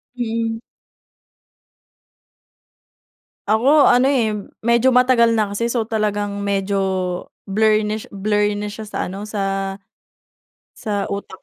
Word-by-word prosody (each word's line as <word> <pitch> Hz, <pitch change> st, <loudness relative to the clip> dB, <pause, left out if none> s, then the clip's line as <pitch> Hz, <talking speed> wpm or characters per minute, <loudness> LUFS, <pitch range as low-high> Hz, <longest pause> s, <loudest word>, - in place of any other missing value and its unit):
Mm. 225 Hz, -1 st, -2 dB, 2.9 s
Ako 270 Hz, +7 st, +5 dB
ano, 260 Hz, +3 st, +4 dB
eh, 225 Hz, -5 st, +1 dB, 0.2 s
medyo 235 Hz, +3 st, +3 dB
matagal 250 Hz, -2 st, +4 dB
na 215 Hz, -2 st, +1 dB
kasi 235 Hz, +2 st, -1 dB
so, 225 Hz, -3 st, -1 dB
talagang 205 Hz, -2 st, -2 dB
medyo 200 Hz, 0 st, -1 dB, 0.7 s
blurnish 215 Hz, +1 st, +1 dB
blurry 205 Hz, +1 st, 0 dB
na 210 Hz, -, -3 dB
siya 210 Hz, +1 st, -7 dB
sa 210 Hz, -, -4 dB
ano, 195 Hz, +3 st, -6 dB
sa 195 Hz, -2 st, -2 dB, 1.0 s
sa 205 Hz, -3 st, -3 dB
utak 200 Hz, -1 st, -6 dB
215 Hz, 105 wpm, -20 LUFS, 200-230 Hz, 2.9 s, Ako